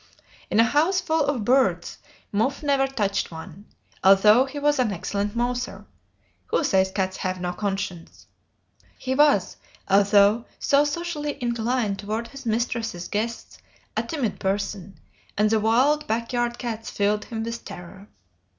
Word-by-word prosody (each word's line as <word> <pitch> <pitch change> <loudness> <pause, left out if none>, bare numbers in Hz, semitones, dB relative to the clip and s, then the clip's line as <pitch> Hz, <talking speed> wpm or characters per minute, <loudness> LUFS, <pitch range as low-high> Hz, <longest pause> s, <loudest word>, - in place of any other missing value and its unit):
In 215 - +1
a - - +8
house 315 +10 +2
full 320 -3 +1
of 260 -7 -1
birds 260 +2 +2 0.3
Muff 225 +9 0
never 275 -2 +2
touched 205 -7 -1
one, 170 +4 -10 0.4
although 210 +6 +6
he 275 +2 -8
was 290 -1 +1
an 240 -4 +2
excellent 200 +2 -3
mouser 245 +1 -2 0.6
(who - - +1
says 190 -8 +2
cats 190 -1 -2
have 185 -1 -3
no 180 0 -3
conscience?). 195 -4 -4 0.7
He 260 - -2
was, 280 -9 +3 0.3
although 200 +3 +4
so 285 +1 +3
socially 295 -1 -3
inclined 235 -3 -1
toward 220 +3 -4
his 275 -3 -10
mistress's 225 -5 -2
guests, 230 +3 -4 0.4
a - - +1
timid 280 -10 -3
person, 195 -2 -3 0.4
and 210 +1 +3
the 220 - +3
wild 255 +8 +2
back 230 +2 -2
yard 240 0 0
cats 225 -2 -5
filled 210 +1 0
him 225 -2 -4
with 230 +1 -5
terror. 180 +3 -10
225 Hz, 145 wpm, -24 LUFS, 200-265 Hz, 0.7 s, a